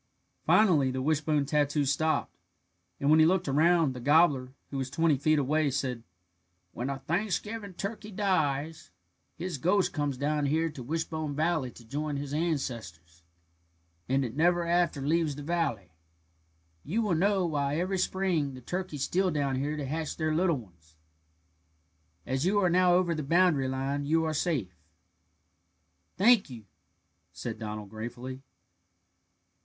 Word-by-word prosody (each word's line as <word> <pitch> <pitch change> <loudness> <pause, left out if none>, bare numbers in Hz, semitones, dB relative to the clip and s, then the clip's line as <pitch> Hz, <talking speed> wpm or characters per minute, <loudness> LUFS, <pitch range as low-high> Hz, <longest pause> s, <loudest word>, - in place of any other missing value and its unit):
Finally 165 -11 +4
the 130 0 -3
wishbone 150 -1 +1
tattoo 145 0 +1
stopped, 155 +3 0 0.6
and 140 +2 +2
when 155 - +6
he 155 - +7
looked 185 0 +1
around, 155 +1 +3
the 125 - -7
gobbler, 145 -2 +3 0.2
who 140 - -3
was 130 -1 -3
twenty 160 +2 +2
feet 155 +3 +2
away, 150 +2 +1
said: 130 -3 -2 0.7
"When 125 +8 -4
a 140 - -2
Thanksgiving 200 +6 -3
turkey 210 +3 -5
dies, 160 -7 -1 0.5
his 175 -4 -5
ghost 185 +6 +2
comes 145 -3 -1
down 145 +1 0
here 160 +3 +1
to 145 - -9
Wishbone 155 +1 -3
Valley 155 -3 0
to 120 - -15
join 145 +4 -3
his 140 0 -5
ancestors, 115 - -3 0.9
and 135 +1 +2
it 115 - -6
never 175 +2 +2
after 170 -4 +1
leaves 160 -1 +1
the 145 - -8
valley. 145 - -2 0.9
You 220 +9 -1
will 205 -4 +1
now 175 +5 +3
know 195 -3 +1
why 145 -2 -1
every 185 +2 -1
spring 175 -8 0
the 130 - -10
turkeys 175 -1 -4
steal 185 +5 +1
down 140 -5 -1
here 145 +3 -2
to 145 - -3
hatch 155 +3 -3
their 155 -1 0
little 170 -1 +2
ones. 85 -9 -15 1.3
As 130 +2 -1
you 195 +4 +2
are 185 -3 +3
now 180 0 +4
over 180 -2 +2
the 155 - -3
boundary 160 -2 +3
line 135 +2 -2
you 160 +1 +2
are 155 - -1
safe." 145 - -1 1.4
"Thank 215 0 +5
you," 115 -4 -10 0.7
said - - -6
Donald 105 -2 -6
gratefully. 120 +4 -7
150 Hz, 150 wpm, -29 LUFS, 135-175 Hz, 1.4 s, he